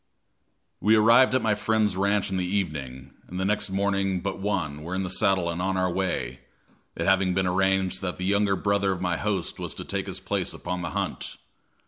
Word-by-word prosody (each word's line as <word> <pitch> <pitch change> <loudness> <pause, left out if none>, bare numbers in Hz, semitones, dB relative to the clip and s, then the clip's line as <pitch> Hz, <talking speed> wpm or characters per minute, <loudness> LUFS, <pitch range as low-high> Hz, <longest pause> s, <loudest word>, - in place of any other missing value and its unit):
We 110 +3 +4
arrived 120 +4 +6
at 130 - +1
my 110 -1 +3
friend's 105 -2 +1
ranch 100 +1 +1
in 95 - 0
the 90 - 0
evening, 70 -7 -4
and 90 - -6
the 95 - 0
next 105 0 +1
morning 95 -1 0
but 100 +2 -4
one 90 -8 -2
were 85 +4 -4
in 95 - -1
the 95 - -3
saddle 95 -2 +2
and 85 +1 -2
on 95 +1 0
our 90 -1 +1
way 85 -9 -2 0.6
it - - -2
having 95 -1 +3
been 95 - +2
arranged 95 0 +1
that 90 -2 -3
the 90 - -3
younger 100 0 +2
brother 100 0 +1
of 90 - -6
my 90 -2 0
host 100 -3 -2
was - - -4
to - - -6
take - - -3
his - - -4
place - - -2
upon 90 0 -4
the 85 - -3
hunt. - - -3
95 Hz, 210 wpm, -26 LUFS, 90-100 Hz, 0.6 s, arrived